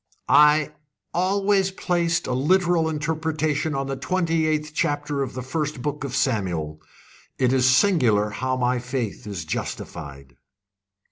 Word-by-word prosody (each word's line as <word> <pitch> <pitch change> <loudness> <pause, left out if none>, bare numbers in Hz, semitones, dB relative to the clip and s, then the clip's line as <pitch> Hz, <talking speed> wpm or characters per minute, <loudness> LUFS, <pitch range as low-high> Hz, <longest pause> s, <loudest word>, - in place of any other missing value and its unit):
"I 150 +1 +5 0.4
always 195 +2 +2
placed 175 -3 0
a 130 - -2
literal 170 +4 +2
interpretation 155 -1 -1
on 135 0 -1
the 135 0 -3
twenty 165 0 0
eighth 155 -1 -1
chapter 145 -2 -1
of 130 -3 -4
the 130 - -4
first 145 0 -3
book 150 0 -3
of 135 -3 -4
Samuel. 90 - -1 0.6
It 130 -1 +2
is 130 -1 +4
singular 125 - +3
how 130 +3 -2
my 125 0 +1
faith 125 -4 -4
is 95 -6 -5
justified!" 70 -4 -6
145 Hz, 135 wpm, -23 LUFS, 125-160 Hz, 0.6 s, I